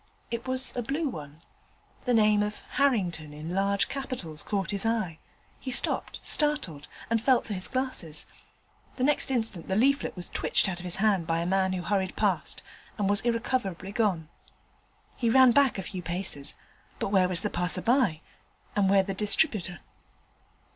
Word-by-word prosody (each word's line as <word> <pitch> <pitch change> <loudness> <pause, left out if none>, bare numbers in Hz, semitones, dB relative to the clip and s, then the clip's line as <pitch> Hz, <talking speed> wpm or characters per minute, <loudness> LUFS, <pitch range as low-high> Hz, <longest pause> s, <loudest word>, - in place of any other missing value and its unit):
It 235 +1 -4
was 260 0 0
a 245 - -1
blue 285 +7 -2
one. 150 - -8 0.6
The 250 - +2
name 210 -1 +4
of 210 0 -2
Harrington 180 - 0
in 155 +3 -6
large 200 +1 +2
capitals 255 - -5
caught 195 +5 -2
his 200 -1 0
eye. 215 -8 -1 0.4
He 265 - -6
stopped, 250 - +2
startled, 285 - +1 0.2
and 230 -1 +2
felt 255 0 +3
for 215 - -4
his 185 -1 -4
glasses. 255 - -2 0.7
The 255 - -3
next 295 +1 +3
instant 225 -9 0
the 190 - -1
leaflet 275 +6 +2
was 180 -1 -5
twitched - - +1
out 180 -2 -3
of 180 - -9
his 175 - +2
hand 195 -5 +1
by 165 0 +1
a 170 - -1
man 190 +1 +1
who 180 -1 -3
hurried 190 0 -1
past, - - -1 0.3
and 205 -3 0
was 205 +1 +3
irrecoverably 230 -5 -2
gone. 200 -7 0 0.9
He 235 - +1
ran 260 +1 +7
back 275 -1 +3
a 190 - -4
few 185 0 -6
paces, 175 -5 -2 0.4
but - - -2
where 190 -2 +3
was 180 0 +4
the 210 - -1
passer 180 +1 -1
by? 230 - +2 0.5
and 200 -2 +3
where 195 0 +5
the 195 0 -4
distributor? 205 - +1
200 Hz, 175 wpm, -28 LUFS, 180-245 Hz, 0.9 s, ran